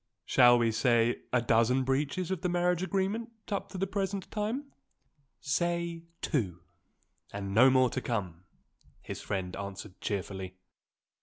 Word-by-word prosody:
Shall 120 -1 +6
we 115 -1 +2
say 120 +1 +2
a 125 -2 +2
dozen 115 +3 +3
breaches 145 +7 -1
of 190 - -2
the 180 - 0
marriage 175 0 +1
agreement 195 +4 -1 0.2
up 200 - -2
to - - -7
the 190 - 0
present 195 0 -3
time?" 230 +7 -3 0.7
"Say 170 +3 -1 0.2
two 95 - -1 0.7
and 100 -1 -4
no 125 +5 +7
more 130 -2 +4
to 130 - -2
come!" 95 -8 -3 0.6
his - - -6
friend 95 -2 -3
answered 100 0 -7
cheerfully. 95 -2 -4
130 Hz, 140 wpm, -30 LUFS, -, 0.7 s, no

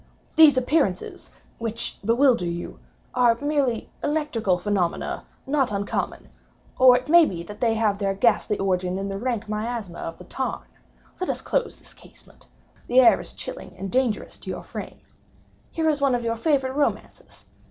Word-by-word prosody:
"These 305 -4 +7
appearances, 255 - 0 0.3
which 230 0 -4
bewilder 235 -3 +3
you, 170 0 -5 0.3
are 240 -2 +4
merely 285 -6 -1
electrical 270 -11 0
phenomena 180 -2 -2 0.2
not 270 -4 +1
uncommon—or 245 +4 0
it 255 - -6
may 340 +2 +7
be 175 - -2
that 210 +4 -11
they 230 -2 +2
have 215 -3 +1
their 195 -1 0
ghastly 210 0 +2
origin 185 -1 0
in 195 +1 -3
the 195 0 -4
rank 235 -2 -2
miasma 215 -3 -4
of 165 - -6
the - - -12
tarn. 260 +8 -4 0.5
Let 370 - -2
us - - -2
close 475 - -1
this - - -19
casement;—the 250 +2 -5
air 250 - +6
is - - -7
chilling - - -7
and 195 +1 -5
dangerous 250 -4 0
to - - -8
your - - -5
frame. - - -8 0.7
Here 320 -1 -1
is 295 -2 +1
one 275 -3 +3
of 240 - -2
your 230 0 -1
favorite 265 0 +1
romances. 290 +1 -3
230 Hz, 160 wpm, -24 LUFS, 200-270 Hz, 0.7 s, These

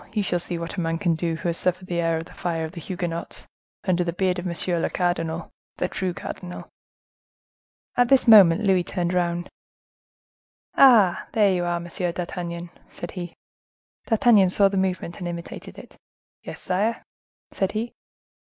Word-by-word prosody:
you 210 - 0
shall 175 -2 0
see 175 0 -4
what 170 +3 -6
a - - 0
man 165 0 -1
can 170 -1 +1
do 165 0 -1
who 165 - -4
has 170 - -1
suffered 185 0 -1
the 175 -2 -2
air 165 -1 +1
of 165 - -5
the - - -15
fire 165 -2 -2
of 160 - -7
the 170 -2 -9
Huguenots, 175 -1 -5 0.4
under 180 -2 +1
the 170 - -2
beard 180 +1 0
of 180 - -4
monsieur 170 0 -1
le - - 0
cardinal—the 170 -2 -3
true 185 -1 -2
cardinal." 180 0 -7 1.3
At 245 0 +4
this 270 -2 +4
moment 205 -3 +8
Louis 190 -3 +3
turned 175 -1 -2
round. 175 -1 0 1.3
"Ah! 225 -10 +6
are 210 -2 +5
you 185 -2 +1
there, 175 0 -1
Monsieur 175 +1 -3
d'Artagnan?" 170 -1 -5 0.2
said 175 - -8
he. 175 -2 -7 0.7
D'Artagnan 220 -4 +5
saw 195 +2 +4
the 195 - -4
movement 185 -3 -2
and 175 - -4
imitated 170 0 -7
it. - - -13 0.4
"Yes, - - -8
sire," 205 +5 -1 0.5
said 190 - -1
he. 225 +2 -3
175 Hz, 170 wpm, -24 LUFS, 170-190 Hz, 1.3 s, moment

